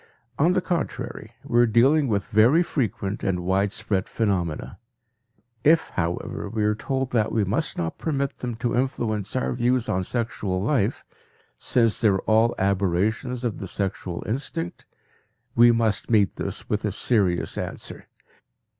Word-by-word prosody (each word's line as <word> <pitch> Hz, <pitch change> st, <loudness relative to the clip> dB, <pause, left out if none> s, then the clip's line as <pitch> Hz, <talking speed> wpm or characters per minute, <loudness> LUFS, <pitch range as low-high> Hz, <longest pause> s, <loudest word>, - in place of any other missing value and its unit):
On 165 Hz, +5 st, +4 dB
the 185 Hz, -, +2 dB
contrary, 175 Hz, -4 st, -4 dB
we 120 Hz, -, +1 dB
are 120 Hz, -, +6 dB
dealing 135 Hz, +7 st, +4 dB
with 100 Hz, -4 st, 0 dB
very 120 Hz, +10 st, +4 dB
frequent 105 Hz, -, -2 dB
and 90 Hz, -2 st, 0 dB
widespread 100 Hz, +1 st, 0 dB
phenomena. 90 Hz, -8 st, -2 dB, 0.8 s
If, 160 Hz, +2 st, +4 dB
however, 85 Hz, -1 st, -3 dB
we 110 Hz, -2 st, -1 dB
are 105 Hz, 0 st, +3 dB
told 130 Hz, +4 st, -2 dB
that 110 Hz, -3 st, +1 dB
we 110 Hz, -, +1 dB
must 95 Hz, -, -1 dB
not 80 Hz, -1 st, -3 dB
permit 140 Hz, -3 st, -2 dB
them 120 Hz, -2 st, -4 dB
to 120 Hz, +1 st, -1 dB
influence 115 Hz, -5 st, -1 dB
our 130 Hz, -, 0 dB
views 125 Hz, 0 st, +1 dB
on 95 Hz, 0 st, 0 dB
sexual 105 Hz, -4 st, -2 dB
life, 110 Hz, +1 st, 0 dB, 0.5 s
since 115 Hz, -3 st, +2 dB
they 115 Hz, -, +5 dB
are 100 Hz, -2 st, +3 dB
all 110 Hz, +2 st, +3 dB
aberrations 100 Hz, +6 st, 0 dB
of 120 Hz, -4 st, -2 dB
the 95 Hz, -, -5 dB
sexual 95 Hz, -2 st, -3 dB
instinct, 110 Hz, -, -4 dB, 0.7 s
we 120 Hz, +1 st, +7 dB
must 115 Hz, -3 st, +1 dB
meet 105 Hz, -4 st, +3 dB
this -, -, -4 dB
with -, -, -1 dB
a -, -, 0 dB
serious 95 Hz, -8 st, 0 dB
answer. -, -, -6 dB
110 Hz, 150 wpm, -24 LUFS, 100-125 Hz, 0.8 s, we